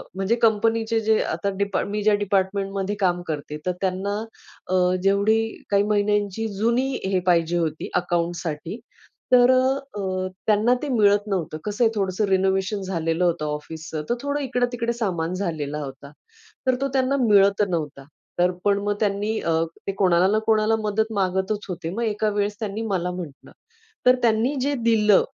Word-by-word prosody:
म्हणजे 195 Hz, +4 st, +1 dB
कंपनीचे 225 Hz, 0 st, +2 dB
जे 220 Hz, 0 st, +3 dB
आता 200 Hz, -, -2 dB
डिपा 200 Hz, 0 st, 0 dB
मी 210 Hz, +1 st, -2 dB
ज्या 215 Hz, -, +4 dB
डिपार्टमेंटमध्ये 195 Hz, 0 st, -1 dB
काम 180 Hz, -2 st, +1 dB
करते, 150 Hz, -1 st, -4 dB
तर 180 Hz, -, +1 dB
त्यांना 190 Hz, +1 st, -1 dB, 0.5 s
अ, 185 Hz, -, 0 dB, 0.3 s
जेवढी 200 Hz, +3 st, +3 dB, 0.3 s
काही 200 Hz, 0 st, +4 dB
महिन्यांची 205 Hz, 0 st, 0 dB
जुनी 235 Hz, +6 st, +1 dB, 0.2 s
हे 190 Hz, -1 st, +1 dB
पाहिजे 170 Hz, -1 st, +3 dB
होती 160 Hz, -2 st, -2 dB
अकाउंटसाठी, 175 Hz, +1 st, -2 dB, 0.5 s
तर 245 Hz, 0 st, +7 dB
अ, 260 Hz, +1 st, +3 dB, 0.2 s
अ, 185 Hz, -1 st, -2 dB, 0.2 s
त्यांना 215 Hz, +3 st, +4 dB
ते -, -, -2 dB
मिळत 205 Hz, -4 st, +3 dB
नव्हतं. 175 Hz, -6 st, -2 dB
कसं 210 Hz, +3 st, 0 dB
आहे, 225 Hz, -, +4 dB
थोडंसं 195 Hz, +1 st, 0 dB
रिनोव्हेशन 190 Hz, +1 st, +1 dB
झालेलं 165 Hz, -2 st, -1 dB
होतं 170 Hz, -3 st, 0 dB
ऑफिसचं, 155 Hz, +1 st, -5 dB
तर 240 Hz, -, +2 dB
थोडं 285 Hz, +1 st, -1 dB
इकडे-तिकडे 245 Hz, -2 st, -1 dB
सामान 180 Hz, -7 st, -2 dB
झालेला 155 Hz, -6 st, -3 dB
होता. 140 Hz, +1 st, -9 dB, 0.6 s
तर 255 Hz, -, +4 dB
तो 275 Hz, -, +1 dB
त्यांना 265 Hz, +1 st, +2 dB
मिळत 200 Hz, -1 st, +5 dB
नव्हता, 150 Hz, -5 st, -3 dB, 0.4 s
तर 180 Hz, +1 st, +4 dB
पण 200 Hz, -1 st, +3 dB
मग 205 Hz, 0 st, 0 dB
त्यांनी 210 Hz, +1 st, 0 dB
अ, 165 Hz, -, 0 dB, 0.3 s
ते 195 Hz, -, +1 dB
कोणाला 185 Hz, -1 st, +4 dB
ना 215 Hz, -, +3 dB
कोणाला 220 Hz, 0 st, +3 dB
मदत 220 Hz, +1 st, 0 dB
मागतच 190 Hz, +3 st, -1 dB
होते. 175 Hz, -2 st, -4 dB
मग 230 Hz, -, -4 dB
एका 215 Hz, -1 st, 0 dB
वेळेस 205 Hz, 0 st, -2 dB
त्यांनी 215 Hz, 0 st, -3 dB
मला 180 Hz, -1 st, -1 dB
म्हटलं, 170 Hz, -6 st, -8 dB, 0.6 s
तर 250 Hz, -, +7 dB
त्यांनी 235 Hz, +4 st, +2 dB
जे 285 Hz, +2 st, 0 dB
दिलं 215 Hz, -3 st, +5 dB
200 Hz, 160 wpm, -23 LUFS, 180-220 Hz, 0.6 s, तर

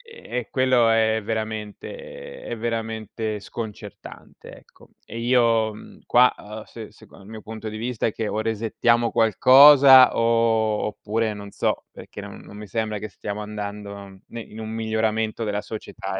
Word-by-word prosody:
e 125 Hz, -, -5 dB
quello 130 Hz, -3 st, +3 dB
è 110 Hz, 0 st, +2 dB
veramente 115 Hz, -, -6 dB
è 120 Hz, -, -5 dB
veramente 110 Hz, -1 st, -4 dB
sconcertante, 105 Hz, +1 st, -10 dB
ecco. -, -, -21 dB, 0.2 s
E 115 Hz, -, -8 dB
io 115 Hz, -2 st, +2 dB
mhmm, 105 Hz, -, -14 dB
qua, 125 Hz, +1 st, +5 dB
uhm, 105 Hz, +1 st, -9 dB
se 110 Hz, -1 st, -11 dB
seco -, -, -18 dB
il 95 Hz, -, -16 dB
mio 110 Hz, 0 st, -9 dB
punto 110 Hz, +1 st, -7 dB
di 110 Hz, -, -7 dB
vista, 120 Hz, 0 st, -3 dB
è 110 Hz, -, -1 dB
che 110 Hz, -, -3 dB
o 105 Hz, -, -2 dB
resettiamo 115 Hz, +1 st, 0 dB
qualcosa 130 Hz, +3 st, +7 dB
o 115 Hz, -2 st, +2 dB
oppure 110 Hz, +1 st, -2 dB
non 100 Hz, -1 st, -10 dB
so, -, -, -1 dB
perché -, -, -11 dB
non -, -, -10 dB
non 100 Hz, -, -14 dB
mi 105 Hz, 0 st, -9 dB
sembra 110 Hz, +1 st, -2 dB
che 110 Hz, -, -6 dB
stiamo 105 Hz, +1 st, -6 dB
andando 100 Hz, -2 st, -8 dB
ne 115 Hz, -, -8 dB
in 110 Hz, 0 st, -12 dB
un 110 Hz, 0 st, -6 dB
miglioramento 110 Hz, 0 st, -1 dB
della 105 Hz, -1 st, -2 dB
società, 110 Hz, -, -6 dB
110 Hz, 160 wpm, -23 LUFS, 105-115 Hz, 0.2 s, qualcosa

